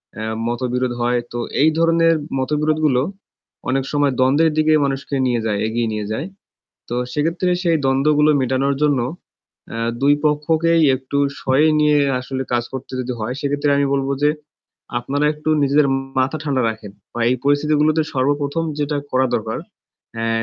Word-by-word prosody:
অ্যা 110 - -5 0.2
মতবিরোধ 125 +1 -1
হয়। 120 0 +1
তো 120 - -3 0.2
এই 155 - +6
ধরনের 165 0 +4 0.3
মতবিরোধগুলো 150 -1 +1 0.7
অনেক 135 0 +1
সময় 145 -2 +1
দ্বন্দ্বের 145 +5 +3
দিকে 155 0 +3
মানুষকে 140 +1 -3
নিয়ে 120 -2 +1
যায়, 105 -2 0
এগিয়ে 115 +1 -1
নিয়ে 105 -1 -3
যায়। 135 +11 -3 0.6
তো 120 - -3 0.2
সেক্ষেত্রে 165 +5 0
সেই 170 -3 +2
দ্বন্দ্বগুলো 150 +3 +3
মেটানোর 130 +2 +1
জন্য 145 -4 +3 0.7
অ্যা 115 - -4 0.2
২ 145 +1 +5
পক্ষকেই 160 +3 +2
একটু 130 +2 -5 0.2
সয়ে 135 +4 +3
নিয়ে 150 -1 +4 0.2
আসলে 130 +1 -4
কাজ 120 -1 +1
করতে 130 0 -7
যদি 125 0 -4
হয় 120 +4 -3
সেক্ষেত্রে 145 0 0
আমি 140 - +2
বলব 135 -1 0 0.2
যে, 150 - +5 0.7
"আপনারা 145 +4 -1
একটু 150 +1 -4
নিজেদের 140 +1 +3 0.3
মাথা 135 +4 0
ঠান্ডা 140 -4 0
রাখেন।" 110 -2 -7 0.2
বা 120 - -5
এই 125 - +2
পরিস্থিতিগুলোতে 150 +2 +2
সর্বপ্রথম 145 +4 0 0.2
যেটা 145 0 -1
করা 130 0 +2
দরকার, 110 0 -3 0.6
অ্যা 115 0 -2
140 Hz, 155 wpm, -20 LUFS, 130-150 Hz, 0.7 s, এই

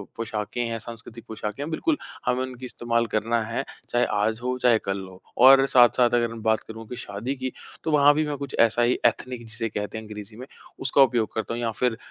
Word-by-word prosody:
पोशाकें 110 0 -3
हैं, 115 -1 -3
सांस्कृतिक 115 0 -10
पोशाकें 105 +3 -5
हैं, 150 - -5
बिल्कुल 300 - 0 0.3
हमें 125 +1 +1
उनकी 130 0 -7
इस्तेमाल 120 -1 -1
करना 115 +2 +1
है, 115 +4 -3 0.3
चाहे 120 0 +2
आज 110 +2 0
हो, 125 0 -1
चाहे 120 -3 +4
कल 100 0 -2
हो। 95 0 -14 0.2
और 135 +2 +8
साथ-साथ 120 -1 +5
अगर 120 -1 +2
हम 115 -1 -8
बात 110 0 +3
करूँ 110 0 -9
कि 125 - -6
शादी 105 +7 -4
की, 130 -1 -4 0.3
तो 160 - -1
वहाँ 145 -1 +6
भी 155 +1 +1
मैं 145 -1 -3
कुछ 140 0 -6
ऐसा 115 +1 +4
ही 120 +1 +3
एथनिक 125 -2 0
जिसे 115 +1 -4
कहते 105 +1 -4
हैं, 110 - -7
अंग्रेज़ी 105 0 -9
में 125 - -8 0.3
उसका 135 +1 +3
उपयोग 120 -4 +3
करता 110 +1 -3
हूँ। 120 - -3
या 115 -1 0
फिर 125 -3 +1
115 Hz, 225 wpm, -25 LUFS, 110-125 Hz, 0.3 s, और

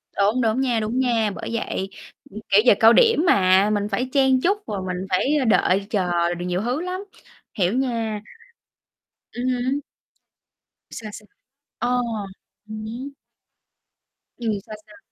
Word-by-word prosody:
Đúng, 210 +6 +2
đúng 225 +2 +1
nha, 245 -4 +1
đúng 220 +4 -2
nha, 230 -5 +1
bởi - - -6
vậy, 195 -4 -3 0.4
ừm, 215 - -9
kiểu, 200 +1 +6
giờ 240 - +8
cao 225 +1 +7
điểm 455 -8 +4
mà, 190 - +4
mình 205 -1 0
phải 250 +5 -1
chen 265 -2 +3
chúc 400 +4 +2
rồi 200 -3 -3
mình 180 +1 -3
phải, 260 +11 +1
a, - - 0
đợi 200 -2 +2
chờ 175 -4 0
điều 175 +1 -5
nhiều 180 +1 -1
thứ 250 +8 -1
lắm, 365 +2 -4 0.5
hiểu 185 +1 0
nha. 230 -5 -1 1.1
Ừm 245 +1 -5
hứm. 255 +2 0 1.1
Sao, 215 -2 -7
sao? 210 - -11 0.5
Ờ, 250 0 +1 0.7
ừm 215 0 -6
hứm. 250 +6 -6 1.3
Ừm, 230 -3 -2
sao, 215 - -8
sao? 210 - -16
220 Hz, 155 wpm, -22 LUFS, 200-255 Hz, 1.3 s, giờ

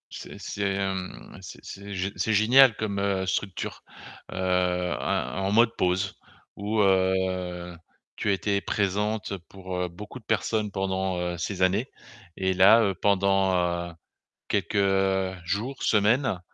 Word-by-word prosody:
C'est - - -9
c'est, 100 -1 -2
hem, 95 -9 -4
c'est 95 - -11
c'est 100 +1 -8
gé 95 +1 -2
c'est 110 - 0
génial 120 +4 +6
comme, 100 -2 -3
heu, 100 -1 0
structure, 95 0 -3 0.5
heu, - - -7
en 90 -4 0
en 95 - 0
mode 115 +1 +4
pause, 95 +1 0 0.4
où, 105 +2 0
heu, 95 -2 0 0.4
tu - - -3
as - - +4
été 100 +1 0
présente 105 +1 -1
pour, 95 -1 -9
heu, 90 0 -1
beaucoup 105 +8 -10
de 110 - -26
personnes 110 -1 0
pendant, 95 -1 -2
heu, 90 0 -2
ces 95 +2 -4
années. 100 +7 +2 0.5
Et 95 0 0
là, 100 +5 +7
heu, 100 -2 +1
pendant, 95 -1 +2
heu, 85 -1 -1 0.5
quelques, - - -1
heu, 95 -1 +1
jours, 110 +10 -3
semaines, 110 +1 +2
95 Hz, 145 wpm, -26 LUFS, 95-105 Hz, 0.5 s, là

